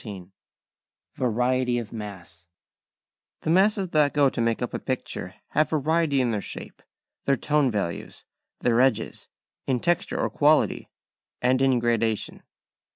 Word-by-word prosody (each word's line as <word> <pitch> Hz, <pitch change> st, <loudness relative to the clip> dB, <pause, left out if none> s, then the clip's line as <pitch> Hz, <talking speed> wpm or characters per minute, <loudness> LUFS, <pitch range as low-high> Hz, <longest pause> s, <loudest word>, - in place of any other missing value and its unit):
XIII 95 Hz, -4 st, -9 dB, 0.8 s
VARIETY 125 Hz, +1 st, +1 dB
OF 115 Hz, -2 st, -5 dB
MASS 90 Hz, -6 st, -9 dB, 0.9 s
The 160 Hz, -, -1 dB
masses 195 Hz, +1 st, +3 dB
that 150 Hz, -3 st, +2 dB
go 145 Hz, -2 st, +5 dB
to 125 Hz, -, -3 dB
make 115 Hz, +1 st, 0 dB
up 120 Hz, -, -4 dB
a -, -, -2 dB
picture 130 Hz, -2 st, -4 dB
have 155 Hz, 0 st, +2 dB
variety 155 Hz, -1 st, +1 dB
in 120 Hz, -2 st, +1 dB
their 105 Hz, -2 st, -1 dB
#shape#, -, -, -7 dB, 0.4 s
their 140 Hz, -, +3 dB
#tone 150 Hz, +1 st, +2 dB
values#, 100 Hz, -7 st, -4 dB, 0.4 s
their 120 Hz, 0 st, +3 dB
#edges#, 130 Hz, -4 st, 0 dB, 0.4 s
in 130 Hz, -2 st, +1 dB
#texture# 175 Hz, +6 st, 0 dB
or -, -, 0 dB
#quality#, -, -, +3 dB, 0.5 s
and 130 Hz, +1 st, +2 dB
in 135 Hz, -2 st, +4 dB
#gradation#. 115 Hz, -2 st, 0 dB
125 Hz, 140 wpm, -25 LUFS, 115-145 Hz, 0.9 s, go